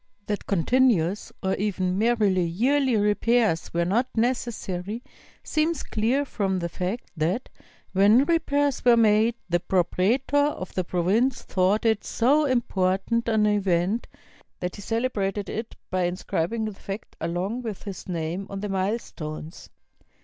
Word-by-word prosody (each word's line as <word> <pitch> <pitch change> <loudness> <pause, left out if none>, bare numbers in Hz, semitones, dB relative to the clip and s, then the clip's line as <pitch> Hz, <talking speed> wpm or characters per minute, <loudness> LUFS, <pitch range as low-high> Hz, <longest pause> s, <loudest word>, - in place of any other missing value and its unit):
That 205 -1 -3
continuous 200 -1 +2
or 190 0 +1
even 185 -2 -1
merely 210 -4 +2
yearly 250 +8 +2
repairs 210 -3 +2
were 170 0 0
not 230 +8 +1
necessary 225 -3 -2 0.4
seems 310 0 0
clear 240 +6 0
from 195 -7 -1
the 170 -1 -2
fact 185 +7 -4
that, 175 +10 -1 0.4
when 210 +7 +5
repairs 290 -4 +1
were 240 -1 +6
made, 220 +1 +4
the 175 -1 +1
propraetor 225 - +1
of 185 - -7
the 185 - 0
province 195 +9 +1
thought 190 +4 +1
it 220 -2 +2
so 285 +6 +2
important 230 -2 0
an 220 -1 +3
event 200 0 +1 0.5
that 180 0 -3
he 205 - -9
celebrated 205 -3 -1
it 225 +1 -5 0.2
by 185 -1 +1
inscrib 175 -2 -2
ing 230 -1 -1
the 215 - -4
fact 195 +2 -8
along 180 +8 -2
with 220 -5 -6
his 195 -2 -7
name 170 +3 -3
on 195 0 -5
the 210 - -3
milestones. 185 -5 -4
205 Hz, 140 wpm, -25 LUFS, 185-235 Hz, 0.5 s, were